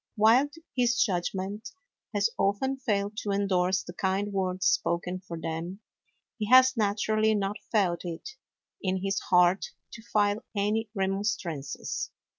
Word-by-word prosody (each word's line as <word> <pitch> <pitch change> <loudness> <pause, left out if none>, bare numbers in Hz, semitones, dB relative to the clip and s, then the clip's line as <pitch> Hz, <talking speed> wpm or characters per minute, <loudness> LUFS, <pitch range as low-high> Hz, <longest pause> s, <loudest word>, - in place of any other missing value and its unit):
While 230 +6 +5 0.3
his 245 -1 +2
judgment 195 +3 -1 0.5
has 205 +3 +2
often 265 +8 0
failed 205 -4 -1
to 210 - -3
endorse 190 -2 +1
the 175 - -9
kind 195 +3 -1
words 185 -1 -1
spoken 180 +1 +1
for 170 -3 -8
them, 165 +5 -5 0.6
he 210 -1 -2
has 260 +1 +7
naturally 215 0 +2
not 200 0 -1
felt 190 -6 +2
it 175 - -6 0.5
in 190 -1 -1
his 195 0 0
heart 180 +1 +4 0.3
to 230 - -10
file 210 -1 +1
any 210 +2 0
remonstrances. 195 -6 -2
200 Hz, 130 wpm, -28 LUFS, 185-215 Hz, 0.6 s, has